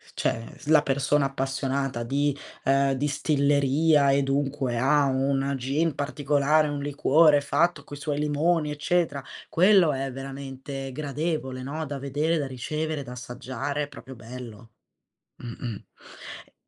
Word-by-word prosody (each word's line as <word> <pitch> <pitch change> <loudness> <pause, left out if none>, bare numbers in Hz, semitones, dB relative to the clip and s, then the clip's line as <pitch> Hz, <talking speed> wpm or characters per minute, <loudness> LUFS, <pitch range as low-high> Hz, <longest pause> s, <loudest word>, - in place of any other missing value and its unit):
cioè 115 0 -2
s - - -14
la 155 -1 +6
persona 140 0 +1
appassionata 135 -2 -2
di 140 +3 0 0.3
ehm, 135 0 +3
distilleria 140 +1 +2
e 140 +1 +3
dunque 135 -2 -1
ha 140 +4 +3
un 135 +1 0
gin 145 +6 0
particolare, 145 +1 +1
un 145 -1 -3
liquore 145 +1 +4
fatto 170 +5 +1
coi 145 - -9
suoi 145 0 -3
limoni 150 +1 +1
eccetera, 150 -1 0 0.3
quello 180 -3 +5
è 135 0 -3
veramente 135 0 -7
gradevole, 145 -1 -3
no, 155 +4 -4
da 140 -1 -5
vedere, 145 +5 0
da 145 -3 -2
ricevere, 150 +4 -3
da 125 - -10
assaggiare, 125 +3 -4
è - - -4
proprio 135 -2 -11
bello. 115 -2 -10 0.7
Mh-mh. 120 -2 -7 0.6
E - - -28
140 Hz, 135 wpm, -26 LUFS, 135-150 Hz, 0.7 s, la